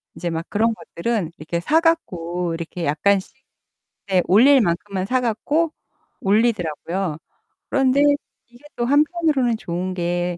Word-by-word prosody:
이제 175 - -3
막 165 0 -3
그런 225 +2 +1
것들은 200 -3 -3
이렇게 170 +2 -3
사 310 - +3
갖고 180 - -1
이렇게 170 +1 -5
약간씩 190 - +1 0.7
네 185 -2 +3
올릴 255 +7 +6
만큼만 190 +1 -1
사 255 +4 +1
갖고 295 +8 0 0.5
올리더라고요. 190 -5 0 0.5
그런데 270 +1 +3 0.5
이게 240 +5 -20
또 240 - -1
한편으로는 290 -4 +2
좋은 180 0 -4
게 175 0 -2
200 Hz, 285 characters per minute, -21 LUFS, 175-255 Hz, 0.7 s, 올릴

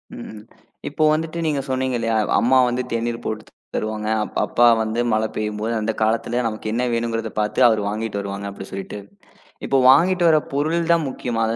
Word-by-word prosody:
ம். 110 -1 -9 0.5
இப்ப 155 +2 +1
வந்துட்டு 160 +2 -2
நீங்கச் 140 -3 -2
சொன்னீங்க 130 -1 -1
இல்லையா? 115 -1 0 0.2
அம்மா 130 +3 +3
வந்து 125 +1 -1
தேநீர் 115 0 -2
போட்டுத் 110 0 -5 0.2
தருவாங்க, 110 0 -2 0.3
அப்பா 120 - +3 0.2
வந்து 110 +2 -2
மழப் 110 0 0
பெய்யும்போது 105 +1 -2
அந்தக் 110 0 -2
காலத்துல 115 +2 +1
நமக்கு 110 -1 -4
என்ன 125 - 0
வேணும்கிறத 115 -1 -2
பாத்து 105 0 -1
அவரு 110 -2 +2
வாங்கிட்டு 105 0 -3
வருவாங்க 100 0 -5
அப்படி 100 -1 -8
சொல்லிட்டு. 95 +1 -6 0.7
இப்ப 135 - +1
வாங்கிட்டு 175 +6 +4
வரப் 155 -2 +3
பொருள் 160 +4 0
தான் 165 -2 +2
முக்கியமா, 120 -3 -3
115 Hz, 165 wpm, -21 LUFS, 110-135 Hz, 0.7 s, வாங்கிட்டு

